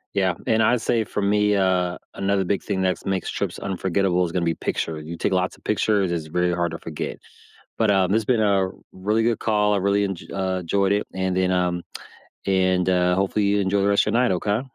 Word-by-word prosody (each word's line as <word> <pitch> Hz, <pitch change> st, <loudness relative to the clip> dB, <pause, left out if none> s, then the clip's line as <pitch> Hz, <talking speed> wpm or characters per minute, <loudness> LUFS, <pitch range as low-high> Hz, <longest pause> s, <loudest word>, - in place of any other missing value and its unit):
Yeah, 95 Hz, -2 st, +2 dB
and 110 Hz, 0 st, +3 dB
I'd 120 Hz, +2 st, +3 dB
say 115 Hz, -1 st, +1 dB
for 105 Hz, -, -4 dB
me, 105 Hz, +1 st, +2 dB
uh, 90 Hz, -2 st, +1 dB, 0.2 s
another 100 Hz, 0 st, 0 dB
big 95 Hz, +2 st, -1 dB
thing 95 Hz, -2 st, -2 dB
that's 90 Hz, -2 st, -1 dB
makes 95 Hz, -1 st, -1 dB
trips -, -, -3 dB
unforgettable 95 Hz, -1 st, 0 dB
is 85 Hz, -, -5 dB
gonna 90 Hz, 0 st, -1 dB
be 85 Hz, -1 st, 0 dB
picture, 80 Hz, -2 st, -3 dB
you 80 Hz, +2 st, -7 dB
take 95 Hz, -, 0 dB
lots 90 Hz, 0 st, 0 dB
of -, -, -25 dB
pictures, 105 Hz, -3 st, +1 dB
it's 80 Hz, -2 st, -3 dB
very 90 Hz, +2 st, 0 dB
hard 85 Hz, -1 st, -1 dB
to 85 Hz, -, -6 dB
forget. 80 Hz, -2 st, -5 dB, 0.6 s
But, 110 Hz, -2 st, +3 dB
um, 95 Hz, -1 st, +2 dB
this 110 Hz, +1 st, +1 dB
been 120 Hz, -2 st, +2 dB
a 100 Hz, -3 st, +2 dB, 0.2 s
really 105 Hz, +4 st, 0 dB
good 115 Hz, -2 st, +1 dB
call. 105 Hz, -1 st, +2 dB
I -, -, +2 dB
really 100 Hz, +1 st, +1 dB
enj 95 Hz, -2 st, -6 dB
uh, 95 Hz, -1 st, -2 dB
...joyed 100 Hz, +3 st, +1 dB
it. 105 Hz, +1 st, 0 dB
And 95 Hz, -1 st, -1 dB
then, 95 Hz, 0 st, +2 dB
um, 90 Hz, -1 st, 0 dB, 0.6 s
and, 95 Hz, -1 st, +2 dB
uh, 90 Hz, -1 st, +2 dB
hopefully 100 Hz, +2 st, 0 dB
you 100 Hz, +1 st, +2 dB
enjoy 100 Hz, +1 st, +1 dB
the 100 Hz, -, +2 dB
rest 100 Hz, -, +4 dB
of -, -, 0 dB
your 120 Hz, -, +3 dB
night, 125 Hz, -, +2 dB
okay? 105 Hz, +5 st, 0 dB
95 Hz, 230 wpm, -23 LUFS, 90-105 Hz, 0.6 s, rest